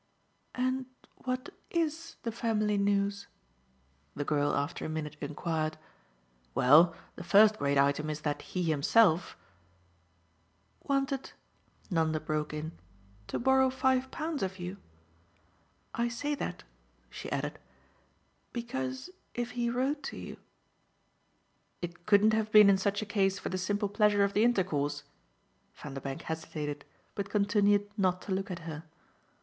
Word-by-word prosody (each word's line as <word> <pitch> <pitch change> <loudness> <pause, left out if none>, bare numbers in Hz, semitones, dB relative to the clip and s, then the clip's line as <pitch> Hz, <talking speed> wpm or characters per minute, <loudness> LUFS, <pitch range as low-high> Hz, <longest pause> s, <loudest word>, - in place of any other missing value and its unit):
"And 255 0 0 0.3
what 255 +5 -4 0.2
IS 330 0 -2
the 230 - -2
family 215 -2 0
news?" 200 0 +1 0.9
the 145 - -3
girl 145 -1 +1
after 145 +4 -2
a - - -3
minute 155 -1 -4
enquired. 155 +1 -2 0.8
"Well, 155 +7 +6 0.2
the - - -7
first 210 +3 +6
great 140 0 +1
item 140 +2 +2
is 155 0 -4
that 145 -1 -2
he 185 - -3
himself 165 +4 +3 0.7
" 85 +2 -40
"Wanted," 275 -1 0 0.6
Nanda 160 -2 +1
broke 155 -1 -2
in, 155 +1 -4 0.6
"to - - -2
borrow 265 +1 +4
five 260 0 +1
pounds 310 -1 -3
of 190 0 -2
you? 180 +2 -5 1.2
I 235 +1 0
say 285 +5 -2
that," 180 -10 -4 0.5
she - - -7
added, - - -2 0.9
"because 130 - -4 0.2
if 240 0 -2
he 240 0 -1
wrote 265 +5 0
to - - -5
you - - -8 0.8
" - - -43
"It 175 0 -7
couldn't 215 +1 +5
have 215 -1 0
been 210 -2 +9
in 195 - +4
such 200 +2 0
a - - -5
case 195 -2 +1
for - - -4
the 185 - -2
simple 205 +3 0
pleasure 205 0 +3
of 200 0 +1
the 210 - +3
intercourse?" 150 -11 +1 0.7
Vanderbank 135 -1 -6
hesitated, 150 -2 -4 0.3
but 200 -1 -4
continued 205 0 +3
not 185 -2 +2
to 200 - -6
look 195 +1 -1
at 170 -3 -6
her. 160 0 -6
195 Hz, 140 wpm, -31 LUFS, 155-230 Hz, 1.2 s, been